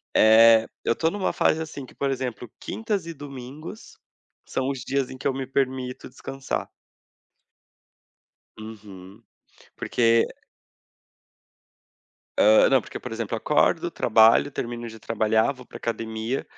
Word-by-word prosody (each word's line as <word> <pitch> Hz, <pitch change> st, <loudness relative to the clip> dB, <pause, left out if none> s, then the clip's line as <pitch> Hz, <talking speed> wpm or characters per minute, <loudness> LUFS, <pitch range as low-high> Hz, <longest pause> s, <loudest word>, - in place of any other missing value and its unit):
Eh, 110 Hz, +1 st, +7 dB, 0.2 s
eu -, -, +2 dB
tô 160 Hz, -, +1 dB
numa 200 Hz, +1 st, -1 dB
fase 160 Hz, -, +2 dB
assim 150 Hz, -4 st, -7 dB
que, -, -, -18 dB
por 140 Hz, -1 st, -1 dB
exemplo, 125 Hz, -3 st, -4 dB
quintas 215 Hz, -5 st, -3 dB
e 165 Hz, -, -5 dB
domingos 145 Hz, -, -10 dB, 0.5 s
são 130 Hz, 0 st, -2 dB
os 135 Hz, -3 st, -4 dB
dias 135 Hz, 0 st, -1 dB
em 130 Hz, -, -9 dB
que -, -, -2 dB
eu 135 Hz, -, +1 dB
me 135 Hz, 0 st, -4 dB
permito 130 Hz, -2 st, -2 dB
descansar. 135 Hz, +1 st, -5 dB, 1.9 s
Uhum. 105 Hz, -2 st, -11 dB, 0.5 s
Porque 115 Hz, -1 st, +2 dB, 2.1 s
Ah, 110 Hz, +1 st, +6 dB
não, 135 Hz, -1 st, +4 dB
porque, -, -, -8 dB
por 125 Hz, -, -8 dB
exemplo, 115 Hz, -2 st, -3 dB
eu -, -, -1 dB
acordo, -, -, +2 dB
trabalho, 115 Hz, +5 st, +4 dB
termino 120 Hz, -3 st, -5 dB
de 110 Hz, 0 st, -11 dB
trabalhar, 110 Hz, +3 st, +1 dB
vou 130 Hz, -2 st, -14 dB
para -, -, -12 dB
a -, -, -7 dB
academia, 115 Hz, +2 st, -3 dB
125 Hz, 140 wpm, -24 LUFS, 110-135 Hz, 2.1 s, Eh